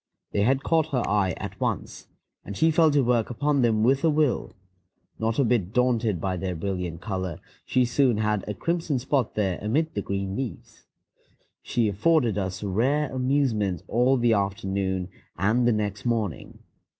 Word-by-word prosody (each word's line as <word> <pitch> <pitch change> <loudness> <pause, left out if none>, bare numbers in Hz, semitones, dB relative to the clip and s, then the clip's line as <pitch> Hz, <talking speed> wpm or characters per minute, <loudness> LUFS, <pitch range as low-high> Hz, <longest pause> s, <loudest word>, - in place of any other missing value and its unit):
They 100 - 0
had 130 +5 +2
caught 160 -2 +2
her 125 -4 -1
eye 100 -4 +1
at - - -7
once, - - -3 0.4
and 100 - -7
she 160 0 +4
fell 160 0 +4
to 145 -2 +3
work 120 -2 +1
upon 140 +3 +1
them 110 -3 +2
with 135 +3 +3
a 165 - +4
will; 150 -3 0 0.6
not 110 0 -1
a 140 - +4
bit 110 -5 0
daunted 120 -6 +1
by 95 +1 -2
their 90 0 -3
brilliant 90 -1 -4
color, 95 -5 -4 0.3
she 125 -1 +3
soon 125 -1 +2
had 105 -2 0
a 105 - -3
crimson 165 - -1
spot 130 -1 -1
there 95 -4 0
amid 145 +10 0
the 100 - -2
green 100 0 -3
leaves. 130 -1 -7 0.7
She 115 -2 0
afforded 115 - +2
us 95 0 -4
rare 130 +9 0
amusement 125 - 0
all 125 +3 +3
the 120 -1 +3
afternoon 95 -2 -1 0.3
and 110 +7 +2
the - - +4
next 105 -2 -2
morning. 110 - -2
115 Hz, 170 wpm, -25 LUFS, 100-130 Hz, 0.7 s, she